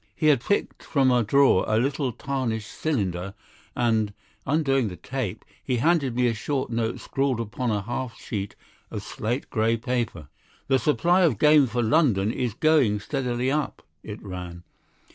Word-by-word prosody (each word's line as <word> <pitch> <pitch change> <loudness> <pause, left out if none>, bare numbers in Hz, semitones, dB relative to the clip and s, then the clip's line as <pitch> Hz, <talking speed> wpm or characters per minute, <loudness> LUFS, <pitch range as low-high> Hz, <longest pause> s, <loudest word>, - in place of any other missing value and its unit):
He 155 - +3
had 140 -5 +4
picked 205 - -1
from 135 -3 +2
a 125 -1 +4
drawer 135 -3 +4
a 110 - +2
little 135 +2 0
tarnished 120 -3 -3
cylinder, 100 - -2 0.4
and, 110 -4 +1 0.3
undoing 135 -5 +2
the 90 - -6
tape, 120 +3 -5 0.2
he 125 - 0
handed 140 -2 +2
me 125 0 +2
a 120 - +2
short 130 +4 -2
note 115 0 -1
scrawled 135 -3 -1
upon 115 +2 -3
a 105 -2 0
half 120 +2 -4
sheet 100 -2 -5 0.3
of - - -5
slate 120 +5 -4
grey 115 0 +2
paper. 115 - -3 0.4
"The 135 -1 +3
supply 170 +8 +3
of 155 - +3
game 150 +2 +5
for 120 0 -1
London 110 - +3
is 120 -3 -2
going 140 -9 +3
steadily 125 +1 -1
up," 150 0 -2 0.2
it 105 0 -8
ran. 90 -3 -7
120 Hz, 160 wpm, -25 LUFS, 110-140 Hz, 0.4 s, game